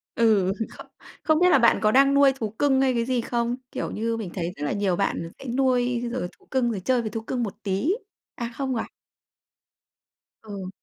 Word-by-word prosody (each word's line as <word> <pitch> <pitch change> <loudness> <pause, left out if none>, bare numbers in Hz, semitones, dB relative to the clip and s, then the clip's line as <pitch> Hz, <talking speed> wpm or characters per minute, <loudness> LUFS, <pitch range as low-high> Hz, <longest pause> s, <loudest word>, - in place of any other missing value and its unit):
Ừ, 210 -5 +3 0.3
kh - - -9 0.4
không 315 0 +3
biết 360 +1 +5
là - - +7
bạn 235 - +4
có 215 - +3
đang 275 +3 +5
nuôi 280 -1 +5
thú 230 -5 -4
cưng 265 +5 +2
hay 265 -1 +3
cái 235 -1 0
gì 250 -1 0
không? 235 +1 -1 0.2
Kiểu - - -4
như, 230 +1 -2
mình 215 -5 -5
thấy 175 -2 -3
rất 145 - -4
là - - -1
nhiều 200 -3 0
bạn 170 -3 -1
sẽ - - -10
nuôi 250 -2 +2
rồi 250 -7 -2
thú - - -26
cưng 255 -3 +1
rồi 210 - -3
chơi 255 -2 +2
với 220 - -3
thú 225 - -4
cưng 245 +2 -2
một 205 -4 -3
tí 195 +6 -1 0.5
à, 235 0 -4
không 265 -2 -1
à? 225 - -2 1.6
Ừ. 200 -4 -7
235 Hz, 215 wpm, -25 LUFS, 205-260 Hz, 1.6 s, là